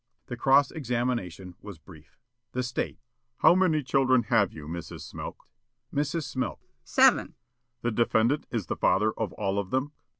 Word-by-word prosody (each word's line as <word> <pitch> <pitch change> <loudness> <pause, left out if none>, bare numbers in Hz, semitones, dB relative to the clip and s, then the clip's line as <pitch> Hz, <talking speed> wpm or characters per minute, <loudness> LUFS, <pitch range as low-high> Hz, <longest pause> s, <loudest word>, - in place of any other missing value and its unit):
The 125 - -6
cross 135 +3 +4
examination 120 - -3
was 100 -4 -9
brief. 80 -1 -17 0.4
The 125 - -1
State: 120 0 -3 0.4
"How - - +6
many 175 -5 +2
children 130 -1 +3
have 100 -4 +3
you, 75 -2 -10
Mrs. 85 0 -7
Smilk?" - - -8 0.5
Mrs. 150 +3 -1
Smilk: 130 -3 -3 0.3
"Seven." - - +4
The - - -25
State: 120 0 -50
"The 120 - +1
defendant 115 +6 +1
is 115 -6 -2
the - - -3
father 105 +3 +2
of 110 -5 -3
all 100 +1 -1
of 100 -2 -4
them?" 130 +5 -1
120 Hz, 165 wpm, -27 LUFS, 100-130 Hz, 0.5 s, How